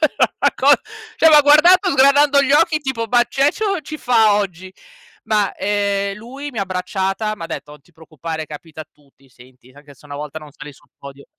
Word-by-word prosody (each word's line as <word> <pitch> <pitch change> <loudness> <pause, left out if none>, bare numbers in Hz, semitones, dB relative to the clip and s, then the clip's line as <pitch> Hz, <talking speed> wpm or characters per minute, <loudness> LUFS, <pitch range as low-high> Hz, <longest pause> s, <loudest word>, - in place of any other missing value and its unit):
era 310 - 0
una - - +2
co - - 0 0.5
cioè 320 - +4
m'ha 300 -1 +7
guardato 350 +6 +5
sgranando 280 +1 +4
gli 275 0 0
occhi 310 +1 +3
tipo, 265 -6 -4
"ma 240 -1 +3
c'è 275 +4 +1
c - - -14
o 395 -4 -1
ci 310 +1 -8
fa 225 -4 +2
oggi?" 185 -2 -5 0.5
Ma, 210 -3 0
ehm, 200 0 -2
lui 265 +7 -9
mi 245 - -16
ha 195 - 0
abbracciata, 190 +3 -3
m'ha 170 - -8
detto: 150 -2 -8
"Non 150 -1 -16
ti 175 - -28
preoccupare, 160 0 -8
capita 155 +1 -11
a 155 - -9
tutti, 140 -2 -28
senti, 125 0 -21
anche 145 +1 -17
se 145 +2 -20
una 145 - -8
volta 150 +1 -7
non 155 -1 -14
sali 150 +1 -12
sul - - -24
podio" 140 0 -13
200 Hz, 210 wpm, -18 LUFS, -, 0.5 s, m'ha